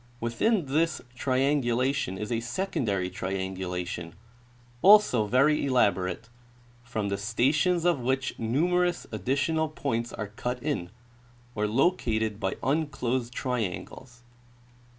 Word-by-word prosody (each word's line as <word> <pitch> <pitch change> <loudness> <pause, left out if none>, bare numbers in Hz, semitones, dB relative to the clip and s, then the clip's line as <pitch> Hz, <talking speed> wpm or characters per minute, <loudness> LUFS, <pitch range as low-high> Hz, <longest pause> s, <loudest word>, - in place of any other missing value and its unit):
Within 155 - +1
this 155 +3 +1
triangulation 130 -4 +1
is 105 +3 -5
a 115 - +1
secondary 115 - -1
triangulation, 90 -2 -4 0.7
also 195 - +6
very 140 +7 +3
elaborate, 100 -6 +1 0.6
from 110 -4 -3
the 100 0 -2
stations 155 - +1
of 175 -5 +3
which 130 +1 -1
numerous 175 +9 +1
additional 140 - 0
points 115 -6 -2
are 105 -2 -5
cut 125 +4 -3
in, 135 - -2 0.6
or 105 -1 0
located 110 - +1
by 95 - -1
un 150 +4 +1
closed 125 -3 -2
triangles. 125 +1 -4
125 Hz, 110 wpm, -27 LUFS, 105-145 Hz, 0.7 s, also